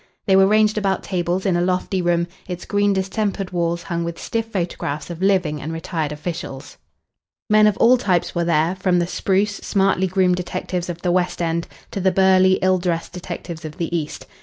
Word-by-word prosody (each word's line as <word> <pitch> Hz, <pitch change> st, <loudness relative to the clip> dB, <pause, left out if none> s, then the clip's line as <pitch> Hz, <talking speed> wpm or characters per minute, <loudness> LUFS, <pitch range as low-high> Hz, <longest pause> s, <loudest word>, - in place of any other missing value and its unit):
They 190 Hz, -, +4 dB
were 190 Hz, 0 st, +6 dB
ranged 215 Hz, +1 st, +3 dB
about 195 Hz, -2 st, 0 dB
tables 180 Hz, 0 st, -1 dB
in 190 Hz, -3 st, +2 dB
a 175 Hz, -, +1 dB
lofty 185 Hz, +1 st, 0 dB
room, 170 Hz, -1 st, +1 dB, 0.2 s
its 180 Hz, -1 st, -6 dB
green 205 Hz, 0 st, +2 dB
distempered 195 Hz, 0 st, -1 dB
walls 170 Hz, -1 st, -1 dB
hung 170 Hz, 0 st, -2 dB
with 170 Hz, 0 st, -4 dB
stiff 225 Hz, 0 st, -3 dB
photographs 170 Hz, -5 st, -3 dB
of 170 Hz, +1 st, -7 dB
living 185 Hz, -7 st, +1 dB
and 155 Hz, -, -5 dB
retired 165 Hz, -2 st, -3 dB
officials. 150 Hz, -3 st, -6 dB, 0.7 s
Men 215 Hz, 0 st, +6 dB
of 210 Hz, -, +1 dB
all 250 Hz, +2 st, +5 dB
types 180 Hz, -6 st, 0 dB
were 170 Hz, -, 0 dB
there, 170 Hz, +1 st, +2 dB
from 185 Hz, -1 st, +2 dB
the 175 Hz, -, +2 dB
spruce, 195 Hz, +3 st, 0 dB
smartly 195 Hz, -2 st, +1 dB
groomed 180 Hz, -1 st, +2 dB
detectives 180 Hz, 0 st, -4 dB
of 170 Hz, -1 st, -6 dB
the 180 Hz, -, +1 dB
West 180 Hz, 0 st, 0 dB
End 170 Hz, 0 st, -1 dB, 0.2 s
to 195 Hz, -, -3 dB
the 190 Hz, +1 st, +3 dB
burly, 190 Hz, 0 st, +5 dB
ill 185 Hz, 0 st, +3 dB
dressed 175 Hz, -2 st, -2 dB
detectives 175 Hz, -2 st, -7 dB
of 155 Hz, +1 st, -8 dB
the 170 Hz, -1 st, -2 dB
East. 155 Hz, -3 st, -4 dB
180 Hz, 195 wpm, -21 LUFS, 170-190 Hz, 0.7 s, were